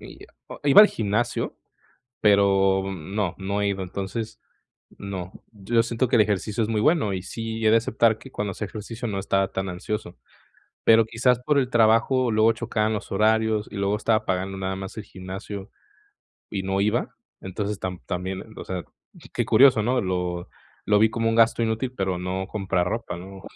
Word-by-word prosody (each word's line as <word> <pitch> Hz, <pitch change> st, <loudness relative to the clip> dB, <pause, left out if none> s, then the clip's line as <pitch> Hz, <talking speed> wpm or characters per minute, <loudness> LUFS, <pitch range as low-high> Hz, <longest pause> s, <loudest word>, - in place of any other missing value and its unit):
i -, -, -12 dB, 0.3 s
o -, -, -10 dB
i 145 Hz, -, +2 dB
iba 135 Hz, -, +10 dB
al 210 Hz, -, +9 dB
gimnasio, 110 Hz, -, -2 dB, 0.6 s
pero 95 Hz, -2 st, +4 dB
no, 95 Hz, +2 st, -3 dB
no 100 Hz, +2 st, -2 dB
he 100 Hz, -, +1 dB
ido. 95 Hz, -1 st, -2 dB
Entonces, 100 Hz, +4 st, -5 dB, 0.6 s
no. 95 Hz, -3 st, -6 dB, 0.2 s
Yo 105 Hz, +2 st, -5 dB
ya 115 Hz, -, +6 dB
siento 120 Hz, +2 st, 0 dB
que -, -, +2 dB
el -, -, +6 dB
ejercicio 105 Hz, +2 st, 0 dB
es 110 Hz, -, -2 dB
muy 110 Hz, -2 st, 0 dB
bueno 145 Hz, -, +2 dB
y 95 Hz, -, -3 dB
sí, 115 Hz, +2 st, -4 dB
he 110 Hz, -, +5 dB
de 115 Hz, -, +6 dB
aceptar 115 Hz, -1 st, +2 dB
que 135 Hz, +4 st, -13 dB
cuando 105 Hz, -5 st, -3 dB
hacía 105 Hz, +2 st, -5 dB
ejercicio 115 Hz, +3 st, -6 dB
no 100 Hz, -3 st, -2 dB
estaba 95 Hz, 0 st, 0 dB
tan 95 Hz, 0 st, -2 dB
ansioso, 90 Hz, -, -5 dB, 0.7 s
pero 115 Hz, 0 st, +6 dB
quizás 120 Hz, +2 st, +2 dB
por 145 Hz, +4 st, +1 dB
el 130 Hz, -3 st, +1 dB
trabajo 120 Hz, +3 st, +3 dB
luego 110 Hz, +1 st, +4 dB
chocaban 110 Hz, -2 st, -1 dB
los 105 Hz, -, -5 dB
horarios 110 Hz, +1 st, +2 dB
y -, -, -8 dB
luego 100 Hz, +1 st, +1 dB
estaba 110 Hz, 0 st, +1 dB
pagando 95 Hz, 0 st, -2 dB
nada 95 Hz, 0 st, -3 dB
más 95 Hz, 0 st, -7 dB
el 110 Hz, -, -5 dB
gimnasio 95 Hz, +2 st, -8 dB, 0.8 s
y 100 Hz, -, -2 dB
no 95 Hz, +1 st, -1 dB
iba. 105 Hz, +4 st, 0 dB, 0.3 s
Entonces, 100 Hz, +2 st, -4 dB
tam 90 Hz, -1 st, -4 dB
también, 95 Hz, +1 st, -4 dB
o -, -, -6 dB
sea, 90 Hz, -2 st, -4 dB, 0.5 s
qué -, -, 0 dB
curioso, 130 Hz, -5 st, +6 dB
¿no? 125 Hz, +4 st, +1 dB
Lo 90 Hz, -2 st, -2 dB, 0.4 s
lo 105 Hz, -1 st, +4 dB
vi 110 Hz, +1 st, +5 dB
como 115 Hz, 0 st, 0 dB
un 115 Hz, -, 0 dB
gasto 115 Hz, 0 st, +4 dB
inútil 115 Hz, +3 st, -1 dB
pero 95 Hz, -2 st, -1 dB
no 95 Hz, +1 st, -3 dB
comprar 95 Hz, -4 st, -1 dB
ropa, 115 Hz, -4 st, -3 dB
¿no? 95 Hz, +2 st, -10 dB
105 Hz, 190 wpm, -24 LUFS, 95-115 Hz, 0.8 s, iba